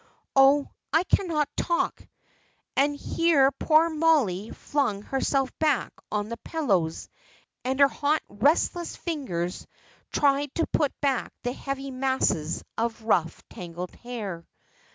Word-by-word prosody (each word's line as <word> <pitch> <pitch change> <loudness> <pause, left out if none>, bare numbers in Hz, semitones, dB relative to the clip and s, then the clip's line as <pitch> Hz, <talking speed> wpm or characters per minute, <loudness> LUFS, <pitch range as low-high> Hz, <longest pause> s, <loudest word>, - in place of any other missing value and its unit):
Oh, 275 +1 +6 0.2
I 320 +4 +4
cannot 330 -6 +1
talk;" 340 - 0 0.7
and 285 +2 +3
here 285 -2 +3
poor 310 +4 +4
Mollie 300 - +2
flung 215 -9 -1
herself 270 +1 0
back 300 -6 +1 0.2
on 210 0 -1
the 235 - -5
pillows, 195 - -1 0.6
and 260 +2 -1
her 280 - +8
hot, 295 +2 0
restless 300 - +1
fingers 185 - -4 0.4
tried 280 -1 +2
to 330 - +1
put 295 -3 -1
back 275 -4 0
the 245 0 -1
heavy 275 0 -5
masses 255 - 0 0.2
of 230 0 -2
rough 180 -7 +1
tangled 175 0 -7
hair. 210 -9 -6
270 Hz, 120 wpm, -26 LUFS, 215-295 Hz, 0.7 s, her